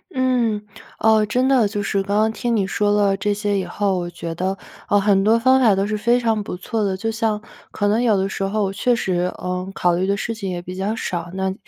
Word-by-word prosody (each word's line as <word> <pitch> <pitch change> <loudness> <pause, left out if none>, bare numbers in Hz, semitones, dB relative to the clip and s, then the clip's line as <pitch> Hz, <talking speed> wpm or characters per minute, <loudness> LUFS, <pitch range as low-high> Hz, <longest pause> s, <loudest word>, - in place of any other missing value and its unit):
嗯。 245 -5 +1 0.4
哦， 220 -1 +4
真 250 +5 +1
的 260 -5 +4
就 205 0 -3
是 200 0 0
刚 200 +1 -1
刚 220 +1 +3
听 235 +1 -1
你 200 -3 +1
说 205 +1 +1
了 205 -1 +3
这 205 +2 -1
些 205 0 -1
以 190 - -1
后， 195 +2 -1
我 175 -1 -3
觉 170 -1 -6
得， 190 +3 -2 0.3
呃， 205 - +4
很 195 -1 +3
多 220 +3 +4
方 260 +2 +4
法 220 -5 +5
都 195 +1 0
是 215 0 -1
非 235 +4 +2
常 225 -3 0
不 180 - -6
错 220 +4 -2
的。 195 -2 -1
就 225 +4 -2
像 220 -2 -1 0.3
可 205 - -1
能 215 +3 +2
有 225 -4 +3
的 190 0 0
时 195 - -4
候 195 0 -1
确 240 +5 +1
实， 180 -4 -1
呃， 180 +1 -4
考 175 -2 +1
虑 185 +2 0
的 200 0 +1
事 230 - -3
情 210 -4 -5
也 175 -1 -4
比 180 +1 -8
较 195 +4 -2
少， 175 -5 -4
那 190 0 -1
205 Hz, 265 characters per minute, -21 LUFS, 190-220 Hz, 0.4 s, 法